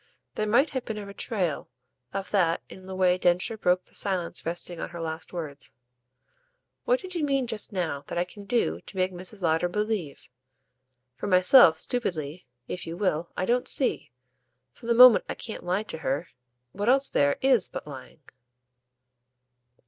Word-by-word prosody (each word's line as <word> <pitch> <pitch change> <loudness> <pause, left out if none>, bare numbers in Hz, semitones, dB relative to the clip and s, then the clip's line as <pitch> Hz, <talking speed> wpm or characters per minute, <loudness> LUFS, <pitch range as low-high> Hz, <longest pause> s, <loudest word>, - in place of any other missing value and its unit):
There 215 - -2
might 255 +8 +3
have 260 -3 -3
been 220 - -5
a 205 - -6
betrayal 200 -5 -3 0.4
of 195 -1 -5
that 175 -5 +2
in 185 0 -12
the 190 - -6
way 185 -1 +3
Densher 180 +5 +1
broke 180 -3 +1
the - - -21
silence 185 -4 -2
resting 175 0 -2
on - - -4
her 170 0 -8
last 160 0 -5
words. 155 -5 -7 1.1
"What - - +3
did 370 -1 -8
you 340 -3 -2
mean 275 -3 +1
just 225 -3 -2
now 170 -7 -2
that - - -5
I 175 - +2
can 200 +3 -12
do 235 +3 0
to 195 - -10
make 185 0 0
Mrs. 185 +2 -8
Lowder 165 +1 +2
believe? 210 -7 -3 0.9
For 170 - -4
myself, 185 -1 +7
stupidly, 160 - -3 0.2
if 180 - -6
you 165 +1 -5
will, 175 -4 -1
I 185 - 0
don't 245 +3 +1
see, 265 - +1 0.6
from 230 - -13
the 235 - +3
moment 250 -1 +9
I - - -3
can't 220 - -7
lie 180 +4 0
to 160 - -6
her, 145 +3 -2 0.4
what 205 +4 -1
else 270 +2 +4
there 140 0 +2
IS 260 -7 +3
but - - -7
lying." 140 +1 -11
185 Hz, 175 wpm, -27 LUFS, 170-220 Hz, 1.1 s, moment